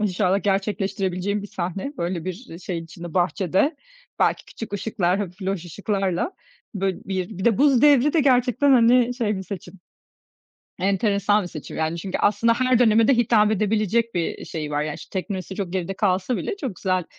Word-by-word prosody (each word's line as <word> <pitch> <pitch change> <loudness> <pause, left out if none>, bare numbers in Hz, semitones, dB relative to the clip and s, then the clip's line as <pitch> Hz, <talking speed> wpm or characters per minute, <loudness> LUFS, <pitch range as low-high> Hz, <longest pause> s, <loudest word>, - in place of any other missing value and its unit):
İnşallah 190 -1 +1
gerçekleştirebileceğin 195 -1 -1
bir - - -6
sahne. 190 - -4
Böyle 170 -1 -2
bir, 185 +7 -5
eee, 165 - -9
şeyin 170 -3 -5
içinde 170 0 -10
bahçede, 190 - +1 0.4
belki - - +1
küçük 225 - -9
ışıklar, 195 -3 0
hafif 190 -1 -5
loş 190 -2 -2
ışıklarla. 195 - -2 0.4
Böyle 195 -1 -1
bir 190 0 -4
bir 190 - -4
de 230 -1 +3
Buz 275 -4 +4
Devri 290 -1 +5
de 325 - +3
gerçekten, 260 +1 +3
hani, 245 0 +5
şey 220 -4 -1
bir 190 - -4
seçim, 180 -1 -8 1.0
enteresan 200 +2 +2
bir 180 - -6
seçim. 155 -4 -8
Yani 160 +1 -1
çünkü 185 +2 -3
aslında 230 +3 +3
her 255 0 +2
döneme 225 -1 +4
de 270 - +5
hitap 215 -3 +4
edebilecek 215 +2 +1
bir 170 -2 -2
şeyi 155 -2 -5
var. 145 0 0
Ya, 150 -1 -3
işte 190 - -5
teknolojisi 190 -1 -6
çok 190 -3 -4
geride 190 0 -2
kalsa 195 +4 0
bile 415 - -3
çok 260 - -5
güzel 185 -2 0
195 Hz, 180 wpm, -23 LUFS, 180-230 Hz, 1.0 s, Devri